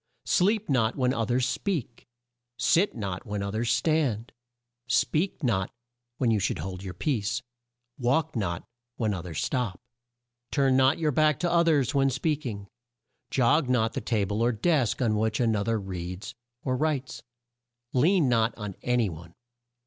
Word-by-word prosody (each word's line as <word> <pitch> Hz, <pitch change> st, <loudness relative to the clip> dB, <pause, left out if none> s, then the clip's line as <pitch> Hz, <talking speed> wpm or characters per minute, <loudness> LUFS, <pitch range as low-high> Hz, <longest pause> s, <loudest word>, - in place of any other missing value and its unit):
"Sleep 210 Hz, +3 st, +2 dB
not 115 Hz, -4 st, +2 dB
when 130 Hz, -2 st, +1 dB
o 115 Hz, 0 st, 0 dB
thers 125 Hz, +2 st, +1 dB
speak, 145 Hz, -, -3 dB, 0.5 s
sit 190 Hz, +5 st, +3 dB
not 100 Hz, -5 st, -4 dB
when 105 Hz, -3 st, -3 dB
o 100 Hz, -, -3 dB
thers 115 Hz, +3 st, 0 dB
stand, 120 Hz, -3 st, +1 dB, 0.6 s
speak 165 Hz, +1 st, +1 dB
not 100 Hz, -7 st, 0 dB, 0.5 s
when 120 Hz, -3 st, +2 dB
you 110 Hz, -, +2 dB
should 100 Hz, -, 0 dB
hold 95 Hz, -1 st, -5 dB
your 95 Hz, -3 st, -7 dB
peace, 115 Hz, -, -1 dB, 0.6 s
walk 135 Hz, +6 st, +1 dB
not 85 Hz, -7 st, -2 dB, 0.3 s
when 110 Hz, -3 st, 0 dB
o 90 Hz, -, -3 dB
thers 85 Hz, -3 st, -4 dB
stop. 125 Hz, -7 st, -1 dB, 0.7 s
"Turn 135 Hz, -3 st, +2 dB
not 130 Hz, +1 st, +4 dB
your 155 Hz, -2 st, +1 dB
back 155 Hz, 0 st, +3 dB
to 175 Hz, -1 st, +1 dB
o 170 Hz, 0 st, +4 dB
thers 145 Hz, -6 st, +2 dB
when 135 Hz, -1 st, +3 dB
speak 145 Hz, +2 st, -1 dB
ing; 100 Hz, -3 st, -6 dB, 0.6 s
jog 130 Hz, +2 st, +3 dB
not 115 Hz, -3 st, +2 dB
the -, -, -3 dB
ta 105 Hz, -4 st, 0 dB
ble 105 Hz, +3 st, -2 dB
or 120 Hz, +1 st, +3 dB
desk 130 Hz, +1 st, +1 dB
on 110 Hz, -3 st, +2 dB
which 110 Hz, 0 st, 0 dB
an 115 Hz, -3 st, +2 dB
o 100 Hz, -, 0 dB
ther 115 Hz, +1 st, 0 dB
reads 90 Hz, +1 st, -6 dB, 0.3 s
or 130 Hz, -2 st, 0 dB
writes; 140 Hz, -2 st, -1 dB, 0.7 s
lean 160 Hz, +4 st, +4 dB
not 115 Hz, -2 st, +2 dB
on 105 Hz, -3 st, -5 dB
a 125 Hz, 0 st, +1 dB
ny 115 Hz, -3 st, +2 dB
one. 85 Hz, 0 st, -9 dB
120 Hz, 170 wpm, -27 LUFS, 105-140 Hz, 0.7 s, not